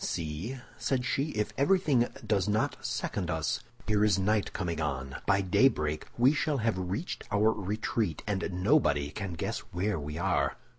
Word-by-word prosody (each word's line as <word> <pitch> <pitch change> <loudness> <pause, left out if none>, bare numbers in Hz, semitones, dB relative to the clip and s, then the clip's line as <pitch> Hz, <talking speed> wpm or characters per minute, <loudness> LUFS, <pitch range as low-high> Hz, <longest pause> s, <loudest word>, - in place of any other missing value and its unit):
"See," 85 - -3 0.2
said 130 -2 0
she, 135 +1 +1
"if 105 0 -1
everything 140 -6 +3 0.2
does 105 -1 +1
not 110 +1 0
second 105 -6 -2
us! 80 -4 0 0.3
Here 105 -1 +2
is 105 -2 +4
night 105 +2 +1
coming 85 -3 -2
on; 65 -3 -3
by 95 - +4
daybreak 90 - +2
we 125 +4 +5
shall 150 -1 0
have 115 -3 +1
reached 125 - -3
our 105 +2 +4
retreat, 105 -3 -2
and 100 -2 -1
nobody 90 - +2
can 95 0 -4
guess 80 - -2
where 95 +1 -2
we 75 +1 -5
are. 90 +1 +1
100 Hz, 160 wpm, -30 LUFS, 85-120 Hz, 0.3 s, we